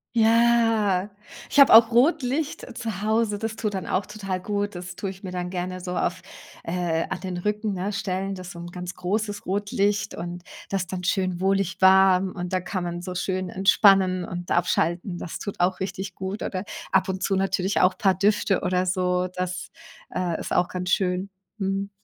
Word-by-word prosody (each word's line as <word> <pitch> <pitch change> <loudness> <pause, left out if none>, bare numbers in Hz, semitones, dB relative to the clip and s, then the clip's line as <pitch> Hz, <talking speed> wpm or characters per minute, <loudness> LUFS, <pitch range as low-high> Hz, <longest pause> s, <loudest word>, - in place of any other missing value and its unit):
Ja, 225 -4 +3 0.4
ich - - -3
habe 275 - +8
auch 225 0 +9
Rotlicht 280 +2 +1
zu 220 -5 -4
Hause, 215 -1 +1
das 225 0 -3
tut 210 -2 -2
dann 190 - -4
auch 185 +1 0
total 195 -3 -4
gut. 205 0 -2
Das 180 0 -7
tue 195 - -3
ich 190 +1 -10
mir 185 - -5
dann 180 0 -3
gerne 185 0 -4
so 180 0 -5
auf, - - -1 0.4
äh 165 -1 -1
an - - -4
den 185 -2 -4
Rücken, 210 +2 -1
ne, 195 +3 -3
stellen. 195 -2 -2
Das 185 -1 -8
ist 175 - -8
so 170 - -10
'n 170 - -7
ganz 180 0 -6
großes 205 +3 -2
Rotlicht 205 +1 0
und 175 +1 -6 0.2
das 195 -2 -1
dann 180 -1 -5
schön 185 -2 0
wohlig 195 -1 +1
warm 190 0 +5
und 180 0 -5
da 185 - +1
kann 185 0 -4
man 175 0 -4
so 180 0 -6
schön 185 0 -2
entspannen 190 -1 +4
und 175 -1 -6
abschalten, 175 +1 0
das 170 - -6
tut 200 -3 -5
auch 180 +1 +2
richtig 190 0 -4
gut. 190 +2 -5
Oder 190 +1 -3 0.3
ab 190 0 +3
und 190 0 -3
zu 195 - +1
natürlich 190 0 0
auch 185 0 +3
paar 190 -2 +3
Düfte 200 0 +1
oder 185 0 +1
so 180 0 0
das, 185 0 -4 0.4
äh, 175 -3 -1
ist - - -6
auch 175 - +3
ganz 180 0 -4
schön, 185 0 0 0.3
mhm. 195 0 -2
190 Hz, 195 wpm, -25 LUFS, 180-205 Hz, 0.4 s, auch